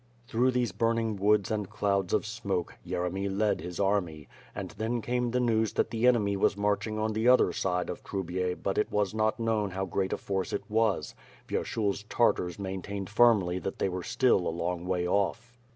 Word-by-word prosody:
Through 120 +2 +2
these 125 -4 0
burning 115 +2 0
woods 105 +1 +2
and 105 -3 -2
clouds 100 -2 0
of - - +1
smoke, 100 -5 -3
Yere 90 0 -2
my 95 +2 -2
led 100 0 0
his 90 +2 -6
army; 90 -8 0 0.3
and - - -5
then 115 +2 -2
came 125 +2 -1
the 125 +2 0
news 110 -3 +1
that - - 0
the 115 +2 +2
enemy 105 -5 +3
was 100 0 +2
marching 105 +1 0
on 110 0 0
the 110 +2 0
other 125 -8 +5
side 90 0 -1
of 90 - -6
Trubiej 90 -1 -3
but 95 - 0
it 105 - 0
was 105 -2 0
not 110 +2 +1
known 110 -3 0
how 95 +1 -3
great 95 +1 -1
a - - 0
force 95 -2 -3
ii - - +1
was 110 -7 +1 0.2
— - - -26
Vyershurs 105 -2 -1
Tartars 90 -7 +1
maintained 95 0 -5
firmly 105 -6 +4
that 95 - -5
they - - 0
were 90 0 -4
still 125 +4 +3
a - - +1
long 85 +1 -3
way 90 -1 0
off. 115 +6 -1
100 Hz, 200 wpm, -29 LUFS, 95-110 Hz, 0.3 s, other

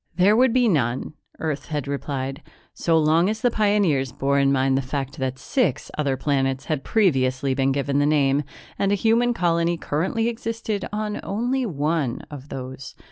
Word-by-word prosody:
There 190 +4 +4
would 255 +1 +4
be 250 0 +3
none, 130 - 0 0.2
Earth 155 -3 -3
had 150 -4 -3
replied, 140 0 -3 0.3
so 165 -1 +1
long 160 +4 +3
as 220 0 -3
the 245 - +3
pioneers 200 - +2
bore 140 +2 +1
in 140 0 +3
mind 135 0 +2
the 135 - +1
fact 135 +2 -4
that 130 0 -2
six 195 - -1
other 140 -3 0
planets 135 -1 0
had 150 -3 -2
previously 135 - +1
been 135 0 +1
given 140 +1 0
that 145 - +3
name, 145 -2 +3 0.4
and 200 0 +2
a - - +4
human 230 +4 +2
colony 170 -2 +1
currently 185 +11 -1
existed 225 -3 -3
on 210 0 -3
only 245 +5 -1
one 150 - -1
of 145 -1 -9
those. 130 0 -7
150 Hz, 175 wpm, -23 LUFS, 135-205 Hz, 0.4 s, There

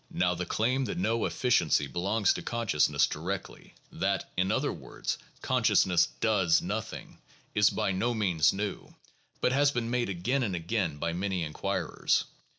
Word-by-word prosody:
Now 90 -1 +1
the 90 0 -4
claim 130 +7 +1
that 105 - -4
no 110 +5 0
efficiency 115 - +2
belongs 95 +8 +1
to - - -5
consciousness 75 -11 +2
directly, - - -6 0.2
that, - - -1
in 95 +1 +1
other - - 0
words, - - -5 0.2
consciousness 85 -2 +3
does 95 -7 +3
nothing, 110 +4 -5 0.3
is 105 0 +5
by 105 -3 -1
no 115 +6 0
means 90 -8 +3
new, 100 0 -5 0.5
but - - +3
has 140 +2 +4
been 120 -4 -2
made 120 -3 0
again 100 +10 -1
and 100 -7 -1
again 85 -2 -2
by 85 +2 -2
many 95 0 -1
inquirers. 75 -1 -1
100 Hz, 155 wpm, -29 LUFS, 85-115 Hz, 0.5 s, is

